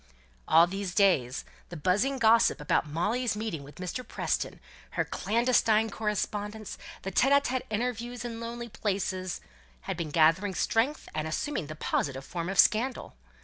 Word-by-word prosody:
All 165 Hz, +1 st, +7 dB
these 190 Hz, 0 st, -4 dB
days 145 Hz, -, +3 dB, 0.2 s
the 175 Hz, -, -7 dB
buzzing 205 Hz, -, +1 dB
gossip 230 Hz, -6 st, +4 dB
about 150 Hz, +1 st, +1 dB
Molly's 210 Hz, +11 st, 0 dB
meetings 210 Hz, -9 st, -4 dB
with 145 Hz, -, -13 dB
Mr. 185 Hz, +7 st, -4 dB
Preston, -, -, -2 dB, 0.4 s
her -, -, +2 dB
clandestine 225 Hz, -1 st, +2 dB
correspondence, 210 Hz, 0 st, -3 dB, 0.2 s
the 195 Hz, -, -4 dB
secret 270 Hz, -1 st, +3 dB
interviews 240 Hz, +2 st, -3 dB
in 230 Hz, -1 st, -5 dB
lonely 235 Hz, +1 st, -5 dB
places, 190 Hz, -4 st, -2 dB, 0.4 s
had -, -, -4 dB
been 165 Hz, -3 st, -3 dB
gathering 165 Hz, +6 st, +3 dB
strength, 255 Hz, +7 st, 0 dB
and 155 Hz, 0 st, -2 dB
assuming 160 Hz, -, -2 dB
the 155 Hz, -, -7 dB
positive 135 Hz, -3 st, -2 dB
form 170 Hz, 0 st, -4 dB
of 195 Hz, -, -3 dB
scandal. 235 Hz, +5 st, +3 dB
210 Hz, 145 wpm, -29 LUFS, 175-235 Hz, 0.4 s, All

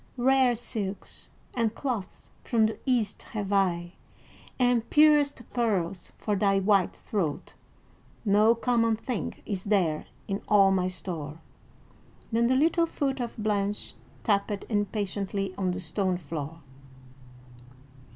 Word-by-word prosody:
"Rare 260 Hz, 0 st, +4 dB
silks 205 Hz, -4 st, -4 dB, 0.2 s
and 230 Hz, -2 st, 0 dB
cloths 235 Hz, -9 st, -4 dB
from 225 Hz, -3 st, +3 dB
the 220 Hz, -, -2 dB
East 235 Hz, -6 st, +1 dB
have 205 Hz, -2 st, -4 dB
I, 175 Hz, -3 st, +1 dB, 0.6 s
and 245 Hz, -2 st, +2 dB
purest 295 Hz, -4 st, +4 dB
pearls, 195 Hz, -7 st, -1 dB
for 210 Hz, -, -1 dB
thy 195 Hz, 0 st, +3 dB
white 195 Hz, -1 st, +2 dB
throat. 170 Hz, -9 st, -3 dB, 0.7 s
No 210 Hz, +3 st, +5 dB
common 230 Hz, -1 st, +2 dB
thing 225 Hz, 0 st, -4 dB
is 195 Hz, -4 st, -3 dB
there 180 Hz, -7 st, +1 dB, 0.2 s
in 200 Hz, 0 st, -2 dB
all 195 Hz, -2 st, +6 dB
my 185 Hz, -1 st, +2 dB
store." 165 Hz, -5 st, -5 dB, 0.9 s
Then 230 Hz, +1 st, +3 dB
the 260 Hz, -, +3 dB
little 335 Hz, +4 st, +3 dB
foot 275 Hz, -4 st, -2 dB
of 240 Hz, -2 st, -4 dB
Blanche 210 Hz, -1 st, -1 dB, 0.3 s
tapped 200 Hz, -1 st, 0 dB
impatiently 200 Hz, -2 st, -1 dB
on 185 Hz, -1 st, -1 dB
the 180 Hz, +1 st, -2 dB
stone 185 Hz, +1 st, 0 dB
floor. 160 Hz, -1 st, -6 dB
205 Hz, 120 wpm, -28 LUFS, 190-235 Hz, 0.9 s, all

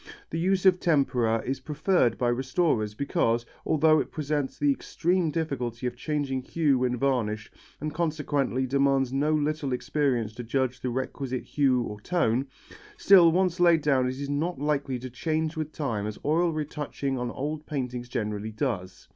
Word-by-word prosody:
The 165 Hz, -, -2 dB
use 190 Hz, +2 st, +1 dB
of 185 Hz, -1 st, +6 dB
tempera 125 Hz, -9 st, +2 dB
is 135 Hz, +1 st, -2 dB
preferred 150 Hz, -1 st, +1 dB
by 120 Hz, -, +1 dB
restorers 120 Hz, -4 st, 0 dB
because, 115 Hz, -3 st, 0 dB, 0.2 s
although 155 Hz, 0 st, +4 dB
it -, -, -2 dB
presents 145 Hz, -3 st, -2 dB
the 145 Hz, -1 st, +3 dB
extreme 175 Hz, +5 st, 0 dB
difficulty 130 Hz, -7 st, -3 dB
of 125 Hz, -1 st, -2 dB
changing 140 Hz, -1 st, -2 dB
hue 145 Hz, -1 st, +1 dB
when 125 Hz, 0 st, 0 dB
varnished 115 Hz, -5 st, -1 dB, 0.3 s
and 150 Hz, +1 st, -4 dB
consequently 145 Hz, -5 st, 0 dB
demands 135 Hz, -1 st, +2 dB
no 145 Hz, +3 st, +1 dB
little 150 Hz, -2 st, -1 dB
experience 125 Hz, -4 st, 0 dB
to 120 Hz, -, -7 dB
judge 130 Hz, +1 st, -1 dB
the 130 Hz, -, -2 dB
requisite 130 Hz, +1 st, -3 dB
hue 130 Hz, -4 st, +2 dB
or 105 Hz, -2 st, -7 dB
tone, 135 Hz, -5 st, +1 dB, 0.5 s
still 180 Hz, -4 st, +7 dB
once 180 Hz, 0 st, +1 dB
laid 170 Hz, -3 st, +5 dB
down 135 Hz, -4 st, +3 dB
it 130 Hz, +1 st, -5 dB
is 140 Hz, -, -3 dB
not 150 Hz, +4 st, -1 dB
likely 140 Hz, -2 st, -1 dB
to 130 Hz, +1 st, -7 dB
change 155 Hz, +4 st, -1 dB
with 155 Hz, -1 st, -3 dB
time 115 Hz, -10 st, -2 dB
as 105 Hz, -, -5 dB
oil 165 Hz, +3 st, +2 dB
retouching 150 Hz, -3 st, -3 dB
on 125 Hz, 0 st, -2 dB
old 150 Hz, +4 st, -4 dB
paintings 125 Hz, -4 st, -4 dB
generally 105 Hz, -2 st, -3 dB
does. 105 Hz, -6 st, -4 dB
140 Hz, 165 wpm, -27 LUFS, 125-155 Hz, 0.5 s, still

